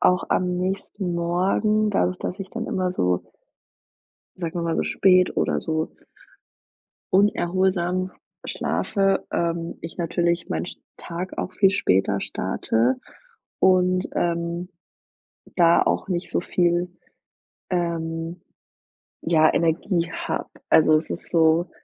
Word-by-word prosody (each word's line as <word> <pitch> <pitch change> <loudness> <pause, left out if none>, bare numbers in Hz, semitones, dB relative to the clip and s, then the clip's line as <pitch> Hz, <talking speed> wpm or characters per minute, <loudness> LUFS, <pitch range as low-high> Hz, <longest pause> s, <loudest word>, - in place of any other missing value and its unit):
auch 180 0 +3
am 180 -1 +1
nächsten 190 0 -3
Morgen, 195 +5 +1
dadurch 90 - +1
dass 180 - -4
ich 190 -1 -7
dann 230 0 -4
immer 185 -1 -1
so 90 - 0 1.1
sagen 175 -1 -4
wir - - -2
mal, 165 -1 0
so - - +1
spät 185 -1 +3
oder - - +1
so 160 -1 -2 1.2
unerholsam 185 -1 +2 0.3
schlafe, 195 -2 0
ähm, 170 0 -2
ich 165 - -8
natürlich 170 0 0
mein - - -2
sch - - -8 0.2
Tag 180 +2 -6
auch 185 - -3
viel 195 +1 +4
später 95 - +1
starte 120 +3 0 0.6
und, 185 0 +3
ähm, 170 +1 -1 0.9
da 170 -1 +5
auch - - 0
nicht 180 -1 -2
so - - 0
viel, 175 0 +1 0.8
ähm, 165 -1 -2 0.8
ja, 160 -2 +4
Energie 170 +1 +1
habe. - - -3 0.2
Also, 155 0 +6
es 155 +1 0
ist - - -6
so, 165 +1 +3
175 Hz, 120 wpm, -24 LUFS, 165-185 Hz, 1.2 s, Also